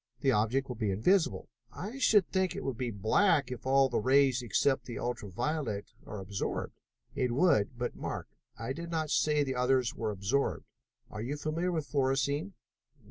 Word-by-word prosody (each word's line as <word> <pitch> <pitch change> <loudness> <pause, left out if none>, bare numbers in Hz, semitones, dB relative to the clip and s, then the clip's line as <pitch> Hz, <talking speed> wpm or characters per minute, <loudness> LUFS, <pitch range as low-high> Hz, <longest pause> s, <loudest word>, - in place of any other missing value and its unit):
The 135 - +3
object 125 +4 +1
will 125 - -6
be 110 -3 0
invisible." 160 - +2 0.2
"I 220 +9 -6
should 210 -8 +4
think 190 -2 +1
it - - -5
would 135 - -2
be 125 +1 -2
black 130 - +2
if 125 +1 -6
all 135 0 +5
the 125 - 0
rays 130 +1 +4
except 130 +3 +1
the 120 -3 -6
ultra 120 -4 -3
violet 120 - -2
were 105 - -8
absorbed." 95 +1 -3 0.4
"It 125 -2 0
would, 125 - +2
but 120 0 -3
mark, - - -5 0.3
I 115 +4 -3
did 170 +3 -7
not 160 -2 -2
say 150 -1 +3
the 135 -2 -2
others 125 -1 +2
were 110 -2 -3
absorbed. 100 +7 -1 0.5
Are 105 - -5
you 135 +6 -3
familiar 160 +4 -1
with 160 -4 -2
fluorescein?" 140 +6 0
130 Hz, 180 wpm, -31 LUFS, 115-155 Hz, 0.5 s, all